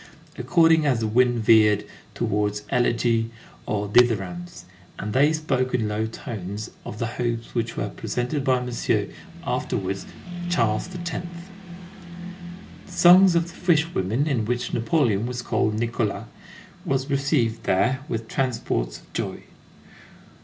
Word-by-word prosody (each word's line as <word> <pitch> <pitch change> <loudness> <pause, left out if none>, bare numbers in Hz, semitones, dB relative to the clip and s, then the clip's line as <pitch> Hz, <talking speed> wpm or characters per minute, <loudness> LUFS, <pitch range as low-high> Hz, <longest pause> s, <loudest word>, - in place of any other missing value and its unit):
according 165 -2 +4
as 130 -6 +1
the - - 0
wind 120 +2 +3
veered 105 -2 +4 0.3
towards 105 0 -1
elegy 115 -2 +1 0.4
or 105 -1 -1
dithyrambs; 100 -6 +1 0.3
and 105 0 -4
they 140 +5 +4
spoke 135 -5 0
in 110 -3 0
low 105 +1 -1
tones 105 -2 -6
of 105 - -7
the 115 - -1
hopes 115 0 -3
which 115 -1 -2
were - - -1
presented 130 +4 -3
by 130 -2 +2
Monsieur, 125 -1 -1 0.4
afterwards 95 0 -2 0.4
Charles 115 -7 +1
X. 175 -1 -4 1.6
The - - -14
songs 180 +1 +7
of 170 - +4
the 170 - -11
fishwomen, 150 - +1
in 135 -8 0
which 125 +2 -2
Napoleon 120 - +1
was 125 0 -4
called 105 -2 0
Nicolas, 115 -1 -1 0.6
were 135 - +1
received 140 -5 0
there 130 +8 +1
with 115 0 -3
transports 105 - -2
of - - -24
joy. - - -4
120 Hz, 130 wpm, -24 LUFS, 105-135 Hz, 1.6 s, songs